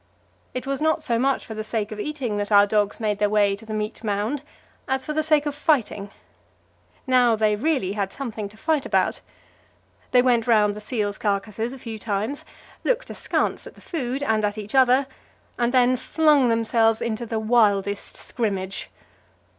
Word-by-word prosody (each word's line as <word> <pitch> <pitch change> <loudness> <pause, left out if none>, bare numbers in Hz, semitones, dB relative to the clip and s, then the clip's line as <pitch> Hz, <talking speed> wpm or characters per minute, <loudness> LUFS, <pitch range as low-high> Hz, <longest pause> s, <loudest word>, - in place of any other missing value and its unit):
It 255 - -3
was 275 +1 -2
not 315 0 +1
so 235 -5 0
much 270 +2 +1
for 225 - -7
the 215 0 -4
sake 215 -1 -3
of 215 - -6
eating 255 -5 -3
that 205 +1 -3
our 205 0 +7
dogs 205 -1 0
made 210 -2 -1
their 210 0 +2
way 205 -1 +3
to 220 +2 -14
the - - -7
meat 215 +2 -4
mound, 215 +6 -1 0.5
as 265 0 -1
for 305 - -3
the 310 - +1
sake 305 -1 +2
of 295 - -1
fighting. 260 -9 0 1.0
Now 250 -3 +4
they 215 -1 +2
really 260 -5 0
had 200 -2 -2
something 220 -6 -5
to 210 - -18
fight 310 +3 0
about. - - +1 0.9
They 250 -1 +5
went 240 -3 +2
round 210 -3 +4
the 210 - -7
seals' 210 -2 -2
carcasses 210 +3 -1
a 270 - -8
few 230 -3 -7
times, 215 +6 -3 0.4
looked - - 0
askance - - -2
at - - -12
the - - -16
food 275 -4 -3
and 220 -5 +1
at 205 +1 -1
each 210 0 -6
other, 260 0 +5 0.5
and 240 0 +2
then 255 0 +4
flung 295 -3 +3
themselves 225 -1 +2
into 235 0 -3
the 225 - -2
wildest 210 -3 +1
scrimmage. 195 -5 -3
225 Hz, 185 wpm, -24 LUFS, 210-265 Hz, 1.0 s, our